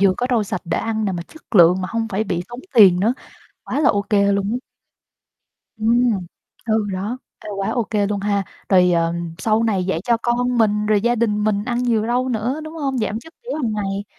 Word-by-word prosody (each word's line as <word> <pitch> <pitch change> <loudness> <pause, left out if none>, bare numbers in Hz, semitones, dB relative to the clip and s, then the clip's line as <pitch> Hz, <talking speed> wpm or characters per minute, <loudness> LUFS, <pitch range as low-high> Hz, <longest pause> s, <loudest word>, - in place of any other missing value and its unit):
vừa 195 -2 +4
có 250 - -1
rau 230 -3 +2
sạch 220 +2 -4
để 170 - -1
ăn 220 -1 -2
nè, 195 - 0
mà 175 - -4
chất 310 - -16
lượng 180 0 +6
mà 185 - -3
hông 230 -1 -2
phải 210 +2 -1
bị 175 -3 -2
tốn 240 +1 -8
tiền 190 -6 +7
nữa, 225 +6 +2 0.5
quá 295 - -2
là 280 - +4
ô 200 0 0
kê 200 -1 +2
luôn 200 0 0
á. - - 0 1.2
Ừm, 225 -4 +1 0.4
ừ, 220 -1 +1
đó. 205 +7 -3 0.2
Ê, - - -11
quá 195 - -1
ô 240 -3 0
kê 205 -2 +1
luôn 205 -1 -2
ha, 200 -1 0 0.2
rồi, 180 -2 +5
ờ, 165 0 +1 0.3
sau 220 +3 +1
này 200 -5 +1
dạy 180 -3 -1
cho 235 -1 +3
con 245 0 0
mình 210 -1 +2
rồi 210 -1 +3
gia 240 +3 +2
đình 210 -3 0
mình 210 -1 0
ăn 240 0 -1
nhiều 230 -3 +1
rau 250 +2 0
nữa, 245 +5 -2
đúng 310 +1 -8
hông? 275 -5 -2
Giảm 215 0 -1
chất 325 +8 -15
béo 485 - -4
hàng 240 -8 -1
ngày. 200 -1 -3
215 Hz, 235 wpm, -20 LUFS, 200-240 Hz, 1.2 s, tiền